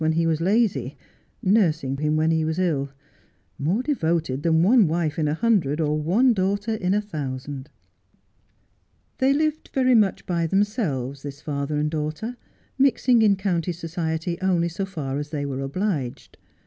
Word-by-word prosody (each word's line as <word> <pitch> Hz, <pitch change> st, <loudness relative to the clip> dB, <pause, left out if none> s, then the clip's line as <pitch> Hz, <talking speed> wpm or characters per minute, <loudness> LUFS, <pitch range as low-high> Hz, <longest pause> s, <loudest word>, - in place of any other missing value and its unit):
15 160 Hz, -, +2 dB
when 160 Hz, -, 0 dB
he 165 Hz, -, +2 dB
was 165 Hz, -1 st, 0 dB
lazy, 185 Hz, -, +1 dB, 0.5 s
nursing 165 Hz, -9 st, +2 dB
him 150 Hz, +1 st, 0 dB
when 160 Hz, +1 st, +2 dB
lie 160 Hz, -1 st, +1 dB
was 160 Hz, +1 st, -2 dB
ill, 155 Hz, -7 st, 0 dB, 0.7 s
more 180 Hz, -, 0 dB
devoted 165 Hz, -, 0 dB
than 160 Hz, +1 st, +3 dB
one 220 Hz, 0 st, +5 dB
wife 160 Hz, -1 st, -1 dB
in 155 Hz, -, +1 dB
a 150 Hz, -, 0 dB
hundred 170 Hz, -9 st, +1 dB
or 150 Hz, -1 st, +1 dB
one 195 Hz, -, +3 dB
daughter 200 Hz, +2 st, 0 dB
in 195 Hz, -3 st, 0 dB
a -, -, +3 dB
thousand. 140 Hz, -6 st, -6 dB, 1.5 s
They 265 Hz, +1 st, +4 dB
lived 310 Hz, +2 st, 0 dB
very 255 Hz, -1 st, +4 dB
much 210 Hz, -5 st, +2 dB
by 170 Hz, -2 st, 0 dB
themselves, 160 Hz, -, -1 dB
this 140 Hz, -1 st, -7 dB
father 145 Hz, 0 st, -3 dB
and 150 Hz, 0 st, 0 dB
daughter, 155 Hz, +10 st, -3 dB, 0.4 s
mixing 250 Hz, -3 st, +4 dB
in 210 Hz, -2 st, +5 dB
county 180 Hz, -3 st, -1 dB
society 165 Hz, 0 st, -3 dB
only 175 Hz, -3 st, +1 dB
so 190 Hz, +3 st, -4 dB
far 145 Hz, -7 st, -4 dB
as 145 Hz, 0 st, -5 dB
they 145 Hz, -2 st, -3 dB
were 135 Hz, -1 st, -3 dB
obliged. 140 Hz, -, -3 dB
165 Hz, 165 wpm, -24 LUFS, 150-200 Hz, 1.5 s, one